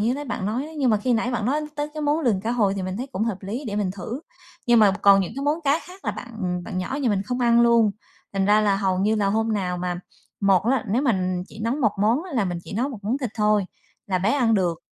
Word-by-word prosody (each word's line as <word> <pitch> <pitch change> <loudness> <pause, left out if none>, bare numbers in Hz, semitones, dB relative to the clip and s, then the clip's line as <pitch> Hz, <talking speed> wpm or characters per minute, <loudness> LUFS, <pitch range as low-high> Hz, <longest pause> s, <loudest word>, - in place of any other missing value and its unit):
như 230 +4 +1
nãy 290 +1 -5
bạn 195 -7 -3
nói 225 +5 -1
đó. - - -10
Nhưng 265 -4 +3
mà 215 - +4
khi 245 +5 0
nãy 235 +1 +1
bạn 235 -4 -1
nói 285 +4 +1
tới 295 0 -2
cái 305 - -4
món 295 +2 +1
lườn 230 -10 +1
cá 220 +4 -2
hồi 210 -5 +2
thì 195 - -3
mình 185 +1 -3
thấy 250 +4 -4
cũng 210 +1 -1
hợp 225 -4 -1
lý, 220 +9 -4
để 205 -2 -3
mình 205 -3 0
thử. 200 +8 -6 0.5
Nhưng 240 -1 +5
mà 210 -3 +6
còn 200 -1 +7
những 190 - -3
cái 275 - -3
món 300 +3 +1
cá 285 +3 +3
khác 370 +2 -14
là - - 0
bạn 185 -7 -4
bạn 185 -3 -4
nhỏ 220 +9 -3
nhà 255 - +2
mình 200 -3 +1
không 245 +5 -3
ăn 235 -1 +4
luôn, 235 -2 +5 0.4
thành 195 -1 0
ra 210 +1 +5
là 205 -2 +2
hầu 190 -2 0
như 210 +3 +2
là 210 -2 +1
hôm 220 +3 +1
nào 180 -4 -1
mà 180 0 -3 0.4
một 195 -3 +4
á, 250 0 +1
nếu 235 +7 +1
mà 185 -8 +1
chỉ 220 - -12
nấu 230 +3 0
một 225 -8 +2
món 225 +9 +2
á 370 - -9
là 230 -6 +1
mình 175 -2 -3
chỉ - - -9
nấu 240 +7 0
một 255 -6 -7
món 235 +6 0
thịt 250 -6 -3
thôi, 210 -2 +2 0.4
là 190 -3 0
bé 195 +4 +1
ăn 240 -6 +3
được 175 -5 +1
220 Hz, 295 wpm, -24 LUFS, 195-250 Hz, 0.5 s, còn